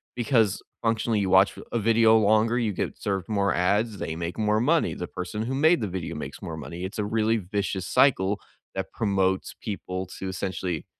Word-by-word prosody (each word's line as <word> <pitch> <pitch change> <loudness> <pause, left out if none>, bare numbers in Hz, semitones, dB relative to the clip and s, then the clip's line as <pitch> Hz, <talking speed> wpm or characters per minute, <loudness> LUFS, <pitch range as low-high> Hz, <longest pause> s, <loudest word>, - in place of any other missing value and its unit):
because 115 -5 +2 0.2
functionally 115 -1 +1
you 95 -2 0
watch 95 +2 +5
a - - -8
a - - +2
video 115 0 +5
longer, 110 +2 +3
you 110 -3 0
get - - -4
served 95 -1 -2
more 100 -2 +1
ads, 100 +4 +1
they 80 - -3
make 85 +3 -4
more 105 0 +2
money, 155 +7 +2
the 90 - -5
person 90 +4 -5
who 130 +3 -3
made 155 0 +4
the 105 - -1
video 90 -2 -5
makes - - -7
more 80 -1 -6
money. 85 +4 -7
It's 95 +3 -5
a 105 - 0
really 110 +1 +1
vicious 100 -1 -3
cycle 100 -7 +3 0.4
that 95 0 -4
promotes 95 -3 0
people 95 -5 -4
to 95 - -4
essentially 95 -3 -3
100 Hz, 195 wpm, -26 LUFS, 95-115 Hz, 0.4 s, watch